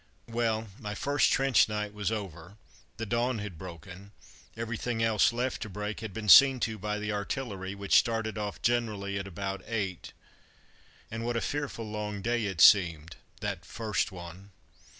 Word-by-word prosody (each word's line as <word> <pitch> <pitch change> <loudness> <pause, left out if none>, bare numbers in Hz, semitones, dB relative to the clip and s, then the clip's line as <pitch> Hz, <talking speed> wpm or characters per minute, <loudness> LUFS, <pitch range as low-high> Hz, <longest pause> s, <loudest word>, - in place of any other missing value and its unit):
Well, 115 -1 0
my 105 -4 -5
first 145 +6 +2
trench 135 -4 +4
night 105 -1 -3
was 105 0 -2
over; 95 -3 -6 0.4
the 115 - -3
dawn 120 +3 0
had 100 -6 -6
broken 90 +3 -10 0.4
everything 115 0 -2
else 110 0 +4
left 125 +2 -2
to 110 - -4
break 105 +2 -4
had 110 -2 -6
been 105 +2 -6
seen 135 +5 +9
to 110 -2 -1
by 105 +2 -2
the 105 0 -3
artillery, 100 -2 -4
which 100 -1 +4
started 115 -3 -1
off 105 -1 -5
generally 105 -5 0
at 95 - -5
about 95 +1 -4
eight. 95 -6 -3 1.0
And 115 +1 -4
what 120 0 -1
a - - +2
fearful 145 -6 -3
long 105 -2 -4
day 120 -2 0
it 95 -5 -2
seemed, 85 -6 +5 0.2
that - - -3
first 110 -3 -2
one! 90 +2 -10
105 Hz, 165 wpm, -29 LUFS, 100-115 Hz, 1.0 s, seen